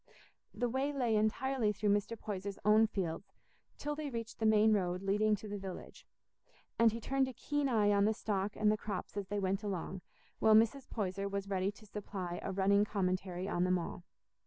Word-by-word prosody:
The 245 - -1
way 265 +4 0
lay 245 -6 +1
entirely 220 +2 +1
through 210 0 0
Mr. 205 +3 -1
Poyser's 200 -2 -5
own 215 +1 +6
fields 190 -2 -4 0.4
till 295 - -3
they 295 -1 -4
reached 230 -2 -6
the 220 - +2
main 215 0 +5
road 180 -2 0
leading 210 +2 +2
to 215 - -9
the 205 0 -4
village, 190 -1 -8 0.7
and 230 -1 +6
he 230 - -4
turned 270 +3 +1
a 260 - -6
keen 290 +3 -1
eye 210 -4 +3
on 200 0 +4
the 220 - +3
stock 200 -2 -2
and 210 -1 +3
the 215 - +1
crops 205 -2 -5
as 200 -2 -3
they 205 - -2
went 195 +1 0
along, 190 -2 -4 0.4
while 220 0 +6
Mrs. 230 +5 +3
Poyser 200 -2 -2
was 200 0 -3
ready 190 +1 +1
to 215 - -16
supply 195 -4 -5
a - - -3
running 200 +1 +3
commentary 185 -2 -2
on 175 - 0
them 185 0 +3
all. 175 0 -5
205 Hz, 200 wpm, -34 LUFS, 195-220 Hz, 0.7 s, own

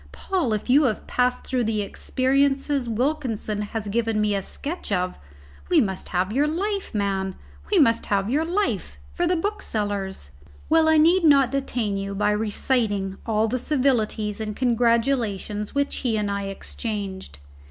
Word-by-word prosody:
Paul, 360 -11 -1
if 210 - -3
you 280 +4 +5
have 220 -5 -1
passed 250 0 0
through 250 -2 0
the 215 -1 0
experiences 270 +3 0
Wilkinson 230 -4 -1
has 210 0 -4
given 225 +1 0
me 210 -1 +2
a 200 - 0
sketch 295 - -6
of, 180 -1 -1 0.5
we - - +5
must 190 -3 -1
have 185 +3 0
your 285 +4 +2
life, 395 +5 -2
man, 195 -2 -1 0.4
we 410 - +4
must 230 -8 +3
have 200 -1 +1
your 285 +7 +1
life 380 +5 -1 0.2
for 350 0 0
the 360 - +2
booksellers." 205 - -3 0.4
Well, 320 0 +5
I 315 - +5
need 340 +4 +5
not 275 -5 +5
detain 245 -7 -1
you 195 0 -4
by 210 +1 +2
reciting 210 -2 0
all 220 0 +2
the 255 +3 -1
civilities 225 -7 0
and 215 -1 -4
congratulations 230 -3 0
which 280 0 0
he 235 -4 0
and 205 -1 -1
I 200 0 -2
exchanged. 195 - -5
225 Hz, 160 wpm, -24 LUFS, 205-275 Hz, 0.5 s, you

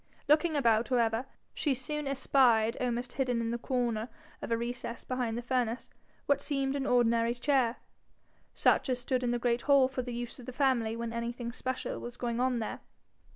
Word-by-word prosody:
Looking 305 +2 +4
about, 235 -4 +3
however, 235 0 +1 0.3
she 285 -4 0
soon 290 +3 -4
espied, 255 -4 +3
almost 245 0 -2
hidden 250 -3 0
in 230 0 -1
the 235 - -2
corner 240 -3 -1 0.3
of - - -5
a 230 - +3
recess 235 0 -4
behind 245 -3 -2
the 240 - -4
furnace, 245 -1 -1 0.3
what 285 - +2
seemed 275 -2 -1
an 280 -1 -2
ordinary 235 -1 +3
chair, 250 -2 +2 0.8
such - - +3
as 255 - +1
stood 250 +1 -1
in 245 - 0
the 240 - +1
great 240 0 0
hall 275 -2 +6
for 260 -1 -3
the 245 0 -6
use 240 +2 -5
of 245 - -11
the 255 - -6
family 245 -5 +1
when 230 0 -4
anything 235 0 -3
special 255 +1 -3
was 240 0 -7
going 235 -1 -2
on 255 0 +2
there. 225 - -4
245 Hz, 190 wpm, -31 LUFS, 235-260 Hz, 0.8 s, hall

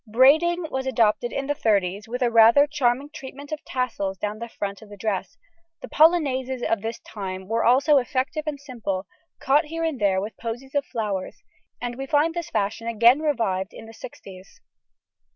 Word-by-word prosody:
Braiding 315 +9 +4
was 265 0 -2
adopted 235 -1 +2
in 275 - -3
the 290 - 0
thirties 200 -5 0
with 245 +2 -2
a 240 - +2
rather 230 +5 +7
charming 285 -1 0
treatment 280 +1 -10
of 310 - -5
tassels 225 -7 -2
down 210 +2 -4
the 235 0 -6
front 200 -1 -5
of 215 - -14
the 205 - -11
dress; 200 -1 -3 0.5
the - - -5
polonaises 265 -6 +2
of 225 -3 0
this 225 +1 -4
time 190 -3 -7
were 225 +2 0
also 275 +4 +5
effective 265 +4 -2
and 295 -2 -3
simple, 225 -9 -4 0.3
caught 290 +4 +3
here 330 +2 -4
and 315 -8 -2
there 195 -2 +3
with 210 +3 -5
posies 240 +4 -6
of 285 -1 0
flowers, 205 -5 -4 0.4
and 240 0 -5
we 270 - -4
find 310 +2 +2
this 345 -2 -4
fashion 210 +3 -2
again 235 +4 +5
revived 225 -11 -1
in - - -10
the 225 - -12
sixties. 195 -4 -12
240 Hz, 185 wpm, -24 LUFS, 210-285 Hz, 0.5 s, rather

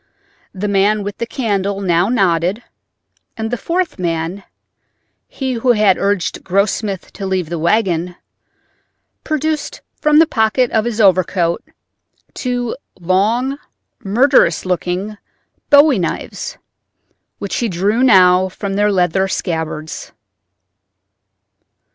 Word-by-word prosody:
The 200 +1 -4
man 200 +1 +2
with 205 0 -6
the 235 - -2
candle 200 -5 -1
now 180 0 +1
nodded, 190 -1 +1 0.7
and 220 0 -3
the - - +1
fourth 340 - -2
man—he 180 - -6
who 245 +1 +2
had 210 -4 +3
urged 200 -2 -1
Grossmith 200 0 -1
to 195 - -5
leave 185 -4 -1
the 170 -1 -3
wagon—produced 215 - -4 0.2
from 300 -1 +4
the 325 - +7
pocket 230 -2 +1
of 220 0 +1
his 235 -2 -3
overcoat 185 -3 +2 0.7
two 245 -2 -2 0.2
long, 220 +10 0 0.4
murderous 215 - +3
looking 185 +3 -2 0.5
bowie 285 -4 +6
knives, 485 - -4 0.8
which 200 - -4
he 235 - -1
drew 200 +6 0
now 185 -6 +5
from 195 +1 -5
their 205 +1 +2
leather 190 0 +1
scabbards. 160 -4 -4
200 Hz, 105 wpm, -17 LUFS, 180-235 Hz, 0.8 s, the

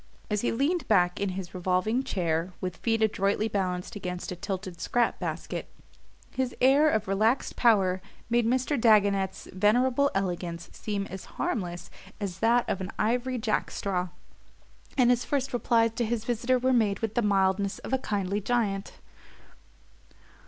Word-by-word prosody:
As 210 -1 +1
he - - 0
leaned 295 +8 0
back 180 -4 +3
in 200 - 0
his 185 -2 -6
revolving 185 +7 0
chair, 170 -4 -1
with 180 -1 -4
feet 225 -1 +1
adroitly 205 0 +1
balanced 185 -3 -2
against 180 -3 -5
a - - -3
tilted 185 -2 -5
scrap 240 -1 +1
basket, - - -4 0.6
his 260 -1 -2
air 275 +4 +5
of 215 -7 0
relaxed 215 +7 +1
power 195 -6 +3 0.3
made 235 -1 +2
Mr. 255 +2 +1
Dagonet's 200 -4 +3
venerable 245 +8 +3
elegance 175 -3 -3
seem 205 -2 -3
as 190 -1 -8
harmless 180 - -3 0.3
as 190 -3 -4
that 235 +2 +3
of 190 - -2
an 185 - -4
ivory 250 +3 0
jack 220 -2 0
straw 185 -2 -2 0.9
and 250 -2 +5
his 245 0 +2
first 275 -2 -1
replies 230 -2 +2
to 235 +2 -2
his 230 0 -2
visitor 245 +2 +1
were 255 +1 +2
made 210 -5 +2
with 225 -2 -2
the 240 - +1
mildness 195 -1 +1
of - - -7
a 265 - +3
kindly 205 -3 -2
giant. 205 -3 -1
210 Hz, 155 wpm, -28 LUFS, 190-240 Hz, 0.9 s, air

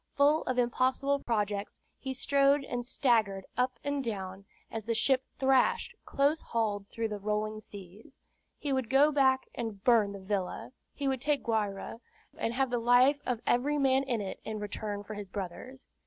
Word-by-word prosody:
Full 290 +2 +4
of 255 - -1
impossible 260 +3 +1
projects, 210 -4 -2 0.2
he 265 - -4
strode 280 +1 +3
and 245 -2 -3
staggered 225 -6 +1
up 250 0 0
and 285 -1 -1
down, 195 -4 -5 0.3
as 220 -2 -5
the 230 0 0
ship 265 +2 +3
thrashed 265 -1 +2
close 285 +3 +1
hauled 210 -3 -1
through 225 +1 -3
the 210 -1 -4
rolling 215 +1 -2
seas. 205 - -13 0.4
He 285 -2 -2
would 260 -4 -1
go 280 +3 +5
back 265 -2 +3
and 220 -4 -5
burn 225 -5 +4
the 200 - -7
villa. 190 +1 -3 0.2
He 280 - -2
would 265 -2 0
take 295 0 +1
Guayra, 215 -2 -2 0.4
and 230 +1 -2
have 265 -1 +1
the 245 - +1
life 250 +5 +5
of 240 -3 -1
every 280 +5 +2
man 270 -1 +3
in 250 -5 -1
it 195 - -5
in 220 -1 -4
return 205 0 -4
for 215 - -7
his 205 -2 -7
brother's. 205 +8 -7
240 Hz, 175 wpm, -30 LUFS, 210-270 Hz, 0.4 s, go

